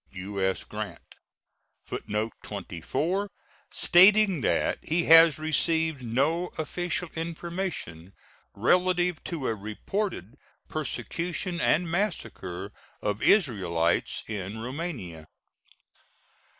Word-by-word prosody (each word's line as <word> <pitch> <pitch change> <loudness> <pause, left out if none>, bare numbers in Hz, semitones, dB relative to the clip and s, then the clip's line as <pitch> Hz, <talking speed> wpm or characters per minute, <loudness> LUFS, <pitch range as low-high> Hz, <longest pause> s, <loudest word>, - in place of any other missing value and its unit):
U.S. 95 0 -2
GRANT. - - -7 0.7
[Footnote 105 +2 -3
24: 145 - -3 0.4
Stating 195 -1 +5
that - - +1
he 170 +2 +1
has 165 -2 +8
received 160 -1 +1
no 140 +10 +1
official 175 +2 -2
information 165 - -5 0.4
relative 180 - +2
to 160 -6 -4
a 115 - +1
reported 110 - -4 0.3
persecution 165 - -3
and 170 +3 +3
massacre 110 - -3 0.3
of 105 +1 -2
Israelites 90 - +2
in 105 -1 -4
Roumania. 115 - -6
155 Hz, 85 wpm, -27 LUFS, -, 0.7 s, has